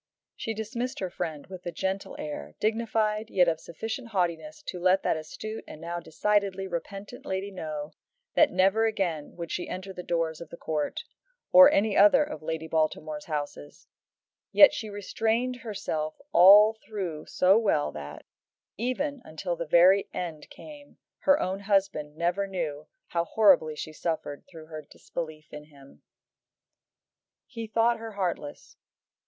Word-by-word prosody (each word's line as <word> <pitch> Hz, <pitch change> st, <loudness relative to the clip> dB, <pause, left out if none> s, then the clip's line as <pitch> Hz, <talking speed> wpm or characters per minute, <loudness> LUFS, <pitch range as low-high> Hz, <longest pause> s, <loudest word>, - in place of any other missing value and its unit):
She 225 Hz, -, -4 dB
dismissed 235 Hz, +4 st, -4 dB
her 185 Hz, -2 st, -3 dB
friend 160 Hz, -5 st, -4 dB
with 185 Hz, -1 st, -10 dB
a -, -, -2 dB
gentle 190 Hz, +3 st, -3 dB
air, 75 Hz, -, -6 dB
dignified, 220 Hz, -1 st, 0 dB
yet 180 Hz, -2 st, +4 dB
of 160 Hz, -1 st, +1 dB
sufficient 225 Hz, +9 st, -6 dB
haughtiness 170 Hz, -7 st, -2 dB
to 180 Hz, -, -6 dB
let 185 Hz, +2 st, +3 dB
that -, -, +2 dB
astute 215 Hz, +8 st, -6 dB
and -, -, -10 dB
now 170 Hz, +1 st, -4 dB
decidedly 195 Hz, +3 st, 0 dB
repentant 195 Hz, +6 st, -6 dB
lady 190 Hz, +1 st, -3 dB
know 155 Hz, -5 st, -6 dB, 0.4 s
that 310 Hz, -, +5 dB
never 195 Hz, +4 st, +3 dB
again 175 Hz, -9 st, -2 dB
would 170 Hz, -2 st, -6 dB
she 175 Hz, -, -3 dB
enter 190 Hz, +1 st, -6 dB
the 180 Hz, -, -6 dB
doors 165 Hz, -2 st, -2 dB
of 170 Hz, -, -9 dB
the 170 Hz, -, -10 dB
Court, 155 Hz, -3 st, -3 dB, 0.5 s
or 275 Hz, +1 st, +10 dB
any 210 Hz, -5 st, +2 dB
other 305 Hz, -1 st, +7 dB
of 300 Hz, +1 st, -7 dB
Lady 160 Hz, 0 st, -4 dB
Baltimore's 155 Hz, -1 st, -1 dB
houses; 145 Hz, -1 st, -6 dB, 0.6 s
yet 295 Hz, -, +8 dB
she 220 Hz, -, -5 dB
restrained 225 Hz, +5 st, -1 dB
herself 195 Hz, -10 st, -4 dB
all 205 Hz, +5 st, +8 dB
through 190 Hz, -8 st, -6 dB
so 190 Hz, +4 st, +4 dB
well 195 Hz, -10 st, +1 dB
that, 75 Hz, -1 st, -9 dB, 0.5 s
even 265 Hz, +4 st, -2 dB
until 160 Hz, +2 st, -4 dB
the 170 Hz, -, -5 dB
very 180 Hz, +5 st, +5 dB
end 165 Hz, -4 st, -5 dB
came, 295 Hz, -2 st, -13 dB, 0.2 s
her 285 Hz, +1 st, +4 dB
own 190 Hz, +2 st, -2 dB
husband 195 Hz, -7 st, 0 dB
never 175 Hz, +4 st, 0 dB
knew 155 Hz, -6 st, -4 dB, 0.2 s
how 170 Hz, -1 st, 0 dB
horribly 175 Hz, -6 st, +4 dB
she 155 Hz, +1 st, -6 dB
suffered 155 Hz, -3 st, -3 dB
through 165 Hz, -3 st, -11 dB
her 155 Hz, -1 st, -8 dB
disbelief 155 Hz, +1 st, -8 dB
in 150 Hz, 0 st, -8 dB
him. 140 Hz, -2 st, -18 dB, 1.4 s
He 230 Hz, -3 st, -7 dB
thought 230 Hz, +2 st, +2 dB
her 225 Hz, -1 st, -7 dB
heartless. 175 Hz, -7 st, -4 dB
185 Hz, 150 wpm, -27 LUFS, 155-215 Hz, 1.4 s, or